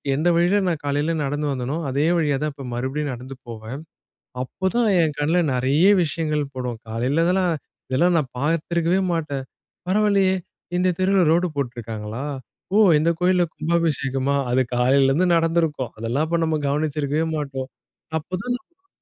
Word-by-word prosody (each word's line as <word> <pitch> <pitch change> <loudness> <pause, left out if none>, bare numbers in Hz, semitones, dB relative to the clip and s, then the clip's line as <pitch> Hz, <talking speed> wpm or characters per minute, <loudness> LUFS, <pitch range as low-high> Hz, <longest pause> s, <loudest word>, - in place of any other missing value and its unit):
எந்த 155 +5 0
வழில 175 +4 +3
நான் 165 -4 -1
காலையில 145 +3 0
நடந்து 145 +2 -1
வந்தோனோ, 135 +4 -2
அதே 140 +4 +1
வழியா 145 -4 +1
தான் 150 -2 -2
இப்ப 140 -2 -9
மறுபடியும் 135 +4 -2
நடந்து 130 +2 -9
போவன். 115 +5 -7 0.6
அப்பதான், 210 - 0
என் 155 -2 0
கண்ல 160 +4 +2
நெறைய 135 +7 +2 0.2
விஷயங்கள் 150 -1 -1
படும். 125 -3 -4
காலையில 130 +9 +1
இதெல்லாம், 180 -2 +2 0.4
இதெல்லாம் 170 +6 +3
நான் 135 -5 -5
பார்த்திருக்கவே 165 +4 +1
மாட்டேன். 145 -5 -3 0.4
பரவாயில்லயே! 200 -2 +3 0.4
இந்த 180 0 +2
தெருவுல 190 -1 +4
ரோடு 175 +2 +2
போட்டிருக்காங்களா? 115 -2 -4 0.5
ஓ! - - +6 0.2
இந்த 165 +2 +2
கோயில்ல 180 0 +4
கும்பாபிஷேகமா! 140 -5 0 0.2
அது 130 +1 +3
காலையிலேருந்து 135 +7 +3
நடந்திருக்கும், 165 -6 +1
அதெல்லாம் 120 +7 0
இப்ப 170 0 +1
நம்ம 155 -1 0
கவனிச்சிருக்கவே 150 +1 0
மாட்டோம். 135 -2 -4 0.5
அப்பதான் 245 - -6
150 Hz, 135 wpm, -22 LUFS, 135-170 Hz, 0.6 s, ஓ